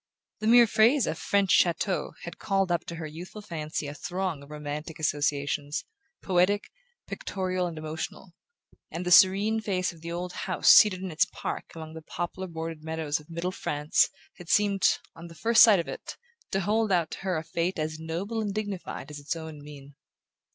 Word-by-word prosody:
The 215 - -2
mere 240 +1 +8
phrase 230 +4 +4
"a - - -1
French 200 -3 +1
chateau" 180 +2 +2
had 170 - -8
called 195 -2 0
up 170 -2 0
to 170 - -6
her 160 -1 -6
youthful 175 +7 -9
fancy 155 -4 -4
a 145 - -5
throng 175 0 -3
of 140 - -14
romantic 150 +2 -6
associations, 145 -1 -1 0.4
poetic, 190 +2 +2 0.3
pictorial 185 -2 -2
and 165 -2 -7
emotional; 160 +3 -6 0.6
and 175 +2 -5
the 180 - -1
serene 195 +4 +6
face 185 -4 -1
of 165 - -17
the 170 +1 -6
old 180 +1 -4
house 185 -1 +3
seated 190 -3 +7
in 185 - -4
its 155 - +3
park - - -4
among 160 -1 -8
the 160 - -8
poplar 175 +4 -5
bordered 165 -2 -6
meadows 160 -2 -2
of 150 - -18
middle 170 +2 -3
France, 150 -4 +1 0.3
had 175 -2 -12
seemed, 200 0 +3 0.2
on 170 +1 -10
her 165 - -13
first 225 +8 +4
sight 220 -4 +8
of 170 - -3
it, - - -7 0.3
to 195 - 0
hold 215 +2 +1
out 170 -4 +2
to - - -6
her 185 -3 -1
a 160 - -3
fate 170 +3 -2
as 155 0 -3
noble 180 +8 -3
and 205 -2 -3
dignified 205 -7 -5
as 145 - -7
its 145 +3 -3
own 160 -2 -8
mien. 145 -1 -12
170 Hz, 190 wpm, -27 LUFS, 155-195 Hz, 0.6 s, mere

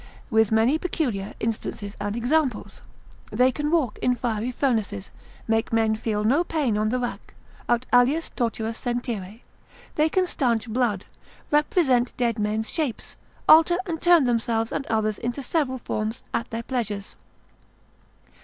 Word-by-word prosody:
with 220 -1 +3
many 230 +8 +3
peculiar 240 - -2
instances 215 -2 -4
and 205 +1 -2
examples; 260 +3 0 0.5
they 255 +1 +3
can 295 +2 -2
walk 300 -9 +1
in 250 - +2
fiery 235 -1 -2
furnaces, 220 - -1 0.4
make 225 0 +1
men 225 -1 +2
feel 215 -1 -2
no 275 +10 +3
pain 295 -10 0
on 215 +1 +1
the 250 - 0
rack, 245 -1 -5 0.3
aut 240 +1 +2
alias 260 +7 +3
torturas 230 -2 -2
sentire; 235 -4 -4 0.5
they 305 +1 +2
can 370 +3 +2
stanch 240 -9 0
blood, 225 -4 0 0.5
represent 295 -5 +2
dead 235 -2 0
men's 215 +1 -1
shapes, 300 -8 -3 0.3
alter 330 +2 +7
and 330 -4 -4
turn 345 -3 +6
themselves 230 -2 0
and 275 - -3
others 215 -2 0
into 245 +4 -3
several 260 -2 0
forms, 220 -2 -4
at 235 - -2
their 230 0 -4
pleasures. 215 -6 -3
240 Hz, 145 wpm, -24 LUFS, 220-275 Hz, 0.5 s, alter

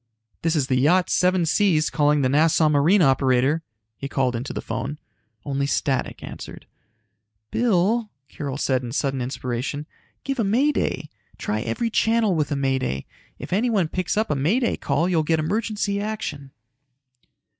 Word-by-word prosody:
"This 165 0 +1
is 145 -4 +2
the 130 -1 +1
Yacht 175 +7 +3
Seven 180 -1 +3
Seas 160 -3 +2
calling 150 -1 +2
the - - +3
Nassau 155 +2 +4
Marine 160 +7 +4
operator," 135 +2 +3 0.3
he 140 - -6
called 130 -3 0
into 120 +4 -4
the - - -4
phone. 145 +2 -4 0.5
Only 140 -1 -1
static 135 -2 -1
answered. - - -9 0.9
"Bill!" 220 0 +2 0.2
Carol 140 -1 -5
said 130 -3 +1
in 120 -2 -6
sudden 135 -2 -1
inspiration. 130 +3 -3 0.4
"Give 275 -2 -3
a - - +3
May 245 +9 +3
Day. 150 - -2 0.3
Try 105 +1 -2
every 120 - -2
channel 225 -2 +2
with 155 -2 -1
a - - +1
May 135 -1 +1
Day. 65 - -3 0.3
If - - -6
anyone 210 -4 +2
picks 185 +3 -2
up 215 -6 +1
a - - +1
May 160 - +2
Day 240 - 0
call 145 +5 0
you'll 175 -3 +2
get 160 +1 +1
emergency 205 +4 -1
action." 205 -10 -4
155 Hz, 165 wpm, -23 LUFS, 135-200 Hz, 0.9 s, Nassau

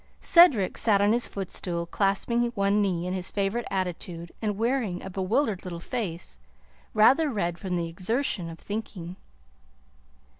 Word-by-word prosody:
Cedric 290 - +5
sat 210 -3 +3
on 205 +2 +4
his 240 +1 +2
footstool, 175 -3 -4
clasping 200 +6 0
one 200 +1 +2
knee 180 -4 0
in 180 - -2
his 185 -1 -1
favorite 205 +4 -1
attitude 175 -2 -4
and 210 -3 -1
wearing 230 -5 -1
a 190 - -7
bewildered 195 +3 0
little 175 -3 -6
face 170 - -5 0.6
rather 270 +9 +5
red 175 -8 -2
from 185 -2 -3
the 170 -1 -1
exertion 185 +1 -1
of 165 - -9
thinking. 190 -3 -6
195 Hz, 145 wpm, -27 LUFS, 175-220 Hz, 0.6 s, Cedric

